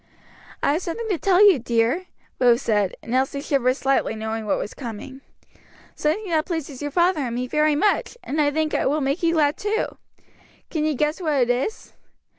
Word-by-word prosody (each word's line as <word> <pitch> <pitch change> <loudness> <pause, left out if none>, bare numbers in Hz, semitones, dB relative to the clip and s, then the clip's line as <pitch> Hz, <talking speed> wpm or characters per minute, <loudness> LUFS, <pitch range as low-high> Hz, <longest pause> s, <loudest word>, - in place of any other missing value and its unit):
"I 280 - +3
have 320 - -1
something 445 +7 -4
to 370 -6 0
tell 395 +1 +5
you, 370 -9 +5
dear," 240 +9 0 0.3
Rose 245 +1 +4
said, 205 -4 +1
and 230 - -5
Elsie 265 +2 +1
shivered 265 -3 +1
slightly, 270 -4 0
knowing 220 0 -4
what - - +1
was - - -5
coming; 260 +2 -8 0.7
"something 355 +8 -1
that 315 -1 +1
pleases 305 -6 -4
your 290 - -2
father 345 +2 +2
and 240 -3 -3
me 250 +1 -2
very 300 +3 +2
much, 415 +7 +1
and 300 +2 -1
I 290 - +3
think 310 +1 -1
will 295 +3 +1
make 280 +3 -1
you 335 -1 +2
glad 295 -2 +2
too. 420 +2 -2 0.7
Can 310 -2 -1
you 310 -1 0
guess 300 +6 -1
what 315 -3 0
it 250 -3 +2
is?" 265 - -3
290 Hz, 195 wpm, -23 LUFS, 250-330 Hz, 0.7 s, tell